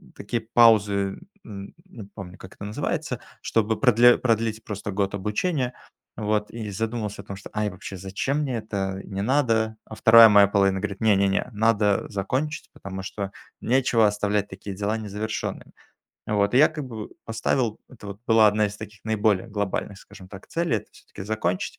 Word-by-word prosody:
такие 115 +3 -3
паузы, 105 -4 +4 0.3
н 100 -2 -9
не 150 - -11
помню 90 -1 -9
как 95 - -13
это 100 - -8
называется, 105 - -3 0.2
чтобы 110 0 0
продле 120 -1 +6
продлить 115 -2 0
просто 105 -1 -5
год 100 0 -1
обучения, 125 - -1 0.4
вот. 105 0 -1
И 110 -2 -6
задумался 110 -1 -3
о - - -20
том, 100 - -7
что: - - -11
"Ай, 105 0 0
вообще 95 +1 -8
зачем 95 +10 -2
мне 135 -5 -1
это, 95 -3 -3
не 100 -1 -4
надо". 115 -3 +1
А 110 - -9
2 115 +1 +9
моя 100 -1 +7
половина 95 -1 +2
говорит: 100 -1 -4
"Не, 110 -2 +4
не, 100 0 +3
не 95 - 0
надо 105 -2 +2
закончить, 130 +9 -3
потому 95 0 -7
что 100 0 -5 0.3
нечего 120 -3 +3
оставлять 105 0 0
такие 95 +1 -8
дела 105 +3 -1
незавершенными", 110 0 -5 0.6
вот. 105 +1 +1
И - - +6
я 150 - +7
как 150 -3 -6
бы 110 -4 -7
поставил, 110 +1 -1
это 110 -5 -12
вот 100 +1 -8
была 110 -1 +6
1 105 0 +2
из 100 0 -7
таких 105 0 -10
наиболее 110 0 +1
глобальных 100 -1 -3
скажем 100 -3 -14
так 95 0 -11
целей- 165 -9 0
это - - -6
всё-таки - - -12
закончить, 100 -4 -2
105 Hz, 175 wpm, -24 LUFS, 100-115 Hz, 0.6 s, 2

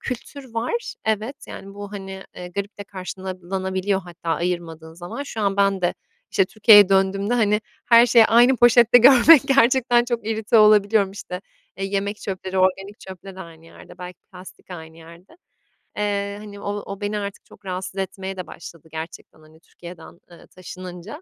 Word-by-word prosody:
kültür 260 0 -8
var. 250 - -3
Evet, 220 +5 -2
yani, 195 0 -10
bu, 205 0 -9
hani, 195 -1 -8
eee, 180 0 -8
garip 200 +3 -6
de 205 - -7
karşılanabiliyor 190 0 -4
hatta 175 -2 -11
ayırmadığın 165 -2 -3
zaman. 175 +11 -7
Şu 230 -6 -7
an 200 -1 0
ben 195 -1 +2
de, 175 - 0 0.4
işte, 195 - +2
Türkiye'ye 205 0 +6
döndüğümde, 195 +3 +1
hani, 210 -2 +2 0.2
her 235 0 +6
şeyi 230 -1 +6
aynı 240 +3 +5
poşette 240 0 +6
görmek... 265 +4 +7
Gerçekten 245 -2 +3
çok 235 -3 -4
irite 220 0 +1
olabiliyorum. 210 -1 +4
İşte, 180 -2 -8 0.4
eee, 195 - -4
yemek 200 +1 -2
çöpleri 190 -1 -5
organik 195 +2 0
çöple 190 0 -11
de - - -9
aynı 165 -2 -13
yerde, 165 - -16
belki 180 0 -9
plastik 185 +1 -14
aynı 160 -2 -10
yerde. 170 - -16 0.6
Eee, 200 -1 -2
hani, 205 -1 -11
o 205 0 -4
o 200 +1 -8
beni 205 +1 -2
artık 200 -1 -7
çok 205 - -19
rahatsız 185 0 -5
etmeye 190 0 -5
de 185 - -6
başladı 165 -1 -12
gerçekten, 160 0 -9
hani, 155 +1 -20
Türkiye'den, 170 0 -14
eee, 170 - -16
taşınınca. 185 - -10
195 Hz, 165 wpm, -22 LUFS, 180-220 Hz, 0.6 s, görmek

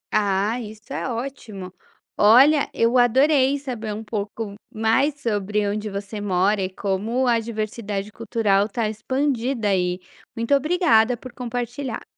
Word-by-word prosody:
Ah, 205 +2 +1
isso 215 0 -10
é - - -3
ótimo. 225 -7 -6 0.4
Olha, 270 +8 +6
eu 235 +2 +2
adorei 265 +3 +4
saber 245 -6 -5
um 220 - -6
pouco 210 0 -4 0.2
mais 245 +7 +1
sobre 210 -4 -1
onde 210 +1 -2
você 200 +1 -6
mora 195 +1 +1
e 185 - -1
como 205 +7 -1
a 235 -1 +3
diversidade 215 -2 -4
cultural 210 -3 +1
tá 220 +1 -1
expandida 245 0 -1
aí. 180 -1 0 0.4
Muito 230 +4 0
obrigada 275 -6 +3
por 255 +1 -11
compartilhar. 245 +1 -4
225 Hz, 135 wpm, -23 LUFS, 205-250 Hz, 0.4 s, Olha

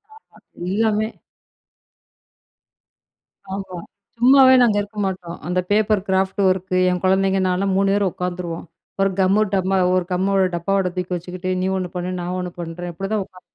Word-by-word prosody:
ஆஹா, 445 - -21 0.3
எல்லாமே. 215 +2 +1 2.4
ஆமா, 195 -2 -6 0.4
சும்மாவே 260 +1 +7
நாங்க 220 -4 +4
இருக்க 205 +1 -10
மாட்டோம். 180 -2 -5
அந்த 180 +1 0
பேப்பர் 210 -1 +3
கிராஃப்ட் 190 +1 0
ஒர்க் 185 0 0 0.2
என் 180 -1 -1
குழந்தைங்க, 190 +1 +2
நான்லாம் 190 +1 0
3 195 0 +2
பேரும் 200 -2 +1
உக்காந்துருவோம். 180 -2 -4 0.4
ஒரு 195 - +3
கம்மு 190 +3 +3
டப்பா 190 0 +1 0.2
ஒரு 185 - +1
கம்மோட, 195 +1 +2
டப்பாவோட 190 +2 0
தூக்கி 180 0 -3
வெச்சுக்கிட்டு, 180 +1 -5
நீ 185 - 0
ஒண்ணு 185 -1 -3
பண்ணு, 180 +1 -3
நான் 180 +1 -3
ஒண்ணு 180 -1 -4
பண்ணுறேன், 175 +1 -5
அப்பிடிதான் 195 +3 -2
உக்காந்து. 185 -1 -18
190 Hz, 145 wpm, -21 LUFS, 180-200 Hz, 2.4 s, சும்மாவே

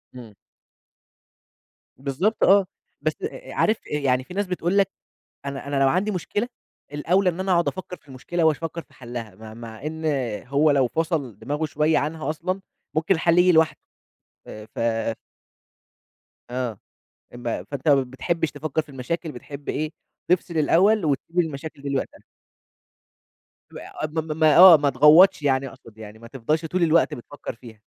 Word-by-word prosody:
إمم. 120 -4 -11 1.6
بالضبط 145 - -1
آه، 200 0 +6 0.4
بس - - 0
أ - - -6
أ - - -8
عارف 215 0 0
إيه، 150 -1 -3
يعني 130 -1 +2
فيه 180 - -11
ناس 205 0 -1
بتقول 180 +1 -1
لك، 195 -1 +3 0.5
أنا 140 0 -5
أنا 140 -1 -1
لو 135 - +4
عندي 190 +7 +1
مشكلة، 205 +4 -2 0.5
الأوْلى 180 +6 +2
إن 175 +1 -5
أنا 190 0 -1
أقعد 170 -1 +3
أفكّر 185 -1 -5
في 150 - -32
المشكلة 140 +6 -3
واش 160 -2 +3
فكّر 165 0 -5
في - - -26
حلّها، 120 -5 -8
م 110 +1 -11
مع 115 +2 -10
إن 160 +1 -5 0.4
هو 145 +3 +3
لو 135 -3 +3
فصل 155 - -2
دماغه 150 +2 -2
شوية 150 +1 +1
عنها 155 +1 -2
أصلًا، 185 +5 -3 0.3
ممكن 160 +4 +2
الحل 170 +1 +2
ييجي 180 +1 +6
لوحده، 160 -1 +3 0.7
آآ 105 0 -9
ف - - -5 1.7
آه، 125 -4 -3 0.6
إم 120 - -10
فأنت 135 +4 -4
ما 140 -2 +5
بتحبش 155 +6 -2
تفكّر 150 +1 -2
في 155 - -20
المشاكل، 145 +5 -4
بتحب 140 +2 -9
إيه؟ 155 +1 -2 0.4
تفصل 175 -1 0
الأول 185 +6 +3
وتسيب 155 +4 -1
المشاكل 155 -3 -3
دي 140 - -5
لوقتها. 140 -1 -3 1.6
اع - - -6
م 160 - 0
م 155 0 -4
م - - +2
آه 165 +3 +9
ما 145 -1 +1
تغوّطش 155 +6 +6
يعني 135 -1 +1
أقصد 115 -5 -14
يعني، 110 0 -11
ما 115 - -12
تفضلش 140 +6 -2
طول 175 +2 0
الوقت 165 0 +3
بتفكّر 135 +2 -8
فيها. 115 -3 -14
155 Hz, 165 wpm, -23 LUFS, 135-170 Hz, 1.7 s, آه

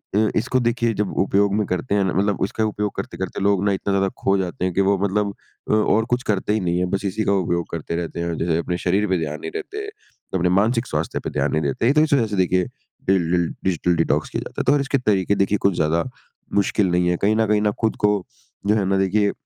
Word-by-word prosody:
अ, 110 0 +3
इसको 130 +4 +1
देखिए 120 -1 +1
जब 105 -1 -1
उपयोग 100 +1 +2
में 105 -1 +1
करते 100 +4 -1
हैं 100 - +3
ना 95 - 0
मतलब 100 +2 +1
इसका 110 +3 -1
उपयोग 105 -1 -2
करते-करते - - -5
लोग 100 -1 +2
ना 100 - +3
इतना 95 +1 -2
ज़्यादा 95 0 +2
खो 100 0 +3
जाते 90 -1 -2
हैं 90 - -1
कि 100 - +2
वो 100 +1 +3
मतलब 100 +1 0 0.4
अ, - - +3
और 110 +1 +3
कुछ 125 - -8
करते 105 0 0
ही 110 - +1
नहीं 90 -1 0
है 90 - +1
बस 100 - -4
इसी 100 +3 -1
का - - +2
उपयोग 85 -3 0
करते 85 0 -4
रहते 85 0 -4
हैं 85 - -2
और 85 - -2
जो 85 +1 -1
है 80 - +2
अपने 90 +1 -2
शरीर 100 +4 +2
पे 95 - +2
ध्यान 75 -1 -4
नहीं - - -5
देते, 420 0 -5 0.5
अपने 90 -1 +2
मानसिक 115 +6 +2
स्वास्थ्य 75 +2 -2
पे - - -5
ध्यान 70 +2 -1
नहीं 80 - +1
देते। 80 - +1
तो 150 - +4
इस 155 -2 +1
वज़ह 120 -5 +3
से 105 - -3
देखिए 90 -1 +2 0.4
डिल 90 -3 +2
डिल 85 -1 +2 0.2
डिजिटल 90 -1 +1
डिटॉक्स 80 - 0
किया - - -3
जाता - - -5
है, - - -3
तो 140 - +5
और 145 - +2
इसके 140 0 0
तरीके 100 -5 +1
देखिए 100 +1 +1
कुछ 100 -2 +2
ज़्यादा 80 +1 +1 0.5
मुश्किल 100 0 +2
नहीं 90 0 +2
है। 90 - +1
कहीं 105 +2 +3
न 110 0 +2
कहीं 105 0 +2
न 105 -1 +2
खुद 110 - +1
को 105 - +5 0.6
जो 105 - +4
है 100 -3 +1
ना, 95 0 +1
देखिए, 100 +2 +2
100 Hz, 260 wpm, -22 LUFS, 90-105 Hz, 0.6 s, तो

